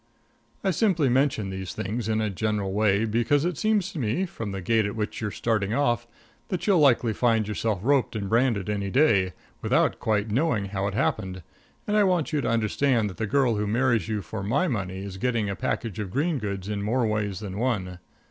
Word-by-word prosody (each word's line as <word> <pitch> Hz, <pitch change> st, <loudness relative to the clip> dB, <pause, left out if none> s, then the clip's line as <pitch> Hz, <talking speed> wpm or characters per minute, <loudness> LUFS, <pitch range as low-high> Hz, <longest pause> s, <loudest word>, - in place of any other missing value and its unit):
I 195 Hz, -, +2 dB
simply 175 Hz, -, +2 dB
mention 125 Hz, -6 st, +1 dB
these 95 Hz, -1 st, -5 dB
things 110 Hz, +2 st, -3 dB
in 110 Hz, 0 st, +1 dB
a 105 Hz, -2 st, -1 dB
general 105 Hz, -1 st, -1 dB
way, 105 Hz, 0 st, +2 dB
because 120 Hz, +7 st, +1 dB
it 175 Hz, -1 st, -1 dB
seems 210 Hz, +1 st, +1 dB
to 170 Hz, -, -6 dB
me, 125 Hz, -, 0 dB
from 115 Hz, -, -6 dB
the 95 Hz, -, -4 dB
gait 110 Hz, +2 st, +2 dB
at 100 Hz, -, -5 dB
which 105 Hz, 0 st, -3 dB
you're 105 Hz, -, -1 dB
starting 110 Hz, -1 st, -1 dB
off, 120 Hz, -4 st, +1 dB, 0.4 s
that 185 Hz, -3 st, -3 dB
you'll 195 Hz, -5 st, +4 dB
likely 125 Hz, -5 st, +4 dB
find 115 Hz, -1 st, +2 dB
yourself 105 Hz, -1 st, -1 dB
roped 135 Hz, -2 st, +2 dB
and 100 Hz, -2 st, -3 dB
branded 115 Hz, -3 st, +1 dB
any 100 Hz, -1 st, -2 dB
day, 100 Hz, -, +3 dB, 0.3 s
without -, -, +2 dB
quite 105 Hz, -1 st, 0 dB
knowing 120 Hz, -4 st, +1 dB
how 100 Hz, 0 st, -2 dB
it 100 Hz, -, -3 dB
happened, 95 Hz, -4 st, -1 dB, 0.4 s
and 210 Hz, -, 0 dB
I 210 Hz, -, +5 dB
want 175 Hz, -5 st, +1 dB
you 150 Hz, -, +1 dB
to 115 Hz, -, -1 dB
understand 115 Hz, 0 st, +1 dB
that -, -, -13 dB
the 110 Hz, -, -2 dB
girl 125 Hz, -2 st, +2 dB
who 105 Hz, 0 st, -1 dB
marries 120 Hz, -2 st, +1 dB
you 105 Hz, -2 st, -2 dB
for 100 Hz, +5 st, -6 dB
my 125 Hz, -, +1 dB
money 95 Hz, -, -3 dB
is 100 Hz, -1 st, -7 dB
getting 115 Hz, -2 st, 0 dB
a -, -, -3 dB
package 115 Hz, -3 st, -3 dB
of 105 Hz, -3 st, -3 dB
green 145 Hz, -, 0 dB
goods 100 Hz, -3 st, -4 dB
in 105 Hz, -1 st, -2 dB
more 115 Hz, +4 st, +1 dB
ways 105 Hz, -3 st, -1 dB
than 100 Hz, -1 st, -5 dB
one. 95 Hz, -8 st, -1 dB
110 Hz, 215 wpm, -26 LUFS, 100-130 Hz, 0.4 s, I